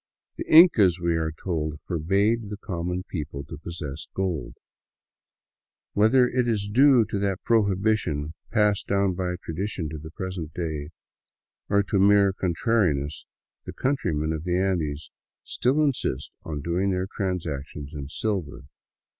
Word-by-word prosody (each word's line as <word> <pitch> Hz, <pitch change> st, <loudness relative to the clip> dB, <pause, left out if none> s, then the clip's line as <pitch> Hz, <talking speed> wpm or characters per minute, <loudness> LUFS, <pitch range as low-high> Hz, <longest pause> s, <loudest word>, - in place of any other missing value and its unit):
The -, -, -7 dB
Incas, 110 Hz, -, +7 dB
we 85 Hz, -1 st, +1 dB
are 80 Hz, -1 st, -1 dB
told, 75 Hz, -2 st, -3 dB
forbade 100 Hz, +6 st, 0 dB
the 105 Hz, -, -5 dB
com 90 Hz, -4 st, -4 dB
mon 90 Hz, +1 st, -2 dB
people 75 Hz, -6 st, -5 dB
to 75 Hz, +2 st, -9 dB
possess 80 Hz, -4 st, -6 dB
gold. 95 Hz, -5 st, -2 dB, 1.4 s
Whether 125 Hz, +5 st, +5 dB
it 125 Hz, 0 st, 0 dB
is 105 Hz, -3 st, 0 dB
due 125 Hz, +2 st, +5 dB
to 100 Hz, -, -3 dB
that 100 Hz, -2 st, -1 dB
prohibition, 100 Hz, -8 st, +1 dB, 0.2 s
passed 105 Hz, -1 st, +2 dB
down 100 Hz, -1 st, +2 dB
by 90 Hz, 0 st, -2 dB
tradition 85 Hz, -1 st, -3 dB
to 80 Hz, 0 st, -6 dB
the 80 Hz, +1 st, -9 dB
present 90 Hz, -4 st, -6 dB
day, 80 Hz, -4 st, -3 dB, 0.8 s
or 100 Hz, 0 st, +3 dB
to 100 Hz, 0 st, 0 dB
mere 100 Hz, 0 st, +5 dB
contrariness, 85 Hz, -, 0 dB, 0.4 s
the -, -, -7 dB
countrymen 80 Hz, -, -1 dB
of 80 Hz, -1 st, -4 dB
the 90 Hz, 0 st, 0 dB
Andes 80 Hz, -7 st, -1 dB, 0.3 s
still 140 Hz, +5 st, +1 dB
insist 120 Hz, -, -1 dB
on 75 Hz, -3 st, -5 dB
doing 90 Hz, +4 st, 0 dB
their 95 Hz, -1 st, 0 dB
transactions 80 Hz, -7 st, -4 dB
in 70 Hz, -2 st, -6 dB
silver. 95 Hz, -5 st, -3 dB
90 Hz, 140 wpm, -25 LUFS, 80-105 Hz, 1.4 s, Incas